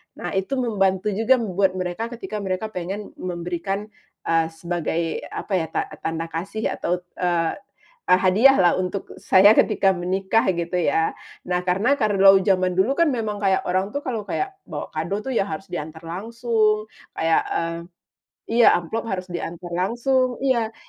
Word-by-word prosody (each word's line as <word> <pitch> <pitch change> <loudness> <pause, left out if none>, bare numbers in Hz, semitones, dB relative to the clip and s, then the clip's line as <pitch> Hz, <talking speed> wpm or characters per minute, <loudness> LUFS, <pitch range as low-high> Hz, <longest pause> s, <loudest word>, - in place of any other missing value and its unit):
nah - - -5
itu 195 +8 -1
membantu 210 -5 +1
juga 225 +6 +3
buat 195 -5 0
mereka, 185 +5 -3
ketika 210 -1 -5
mereka 195 +2 -3
pengen 195 +3 -5
memberikan, 180 +4 -4 0.3
eee, 165 -1 +2
sebagai 165 0 -3
apa 200 - -6
ya 160 - -2
ta - - -1 0.2
tanda 165 0 -4
kasih 195 +7 -3
atau, 180 +1 -2 0.2
eee 175 -2 +1 0.6
eee, 180 - +5
hadiah 220 +9 +6
lah, 180 -3 +3
untuk 185 +1 -3
saya 195 +2 +6
ketika 210 -3 +4
menikah 190 +4 0
gitu 170 +1 -2
ya. 160 0 +1 0.3
Nah, 180 0 -1
karena 225 +11 +2
kalau 195 -3 +6
zaman 185 -2 +2
dulu 250 +9 +3
kan 335 -3 +3
memang 215 -4 -3
kayak 190 -2 +2
orang 185 +3 0
tuh 285 - -2
kalau 240 -7 -4
kayak 385 - -3
bawa - - -6
kado 170 +6 -2
tuh 260 +4 -4
ya 200 - +3
harus 195 0 -6
diantar 160 -1 -7
langsung, 215 +3 0 0.2
kayak 165 0 +1
mmm 165 0 -2 0.7
iya 235 0 +6
amplop 220 +7 -2
harus 185 -3 -4
diantar 175 0 -5
langsung 240 +8 +1
iya. 235 -5 +1
190 Hz, 160 wpm, -23 LUFS, 175-220 Hz, 0.7 s, hadiah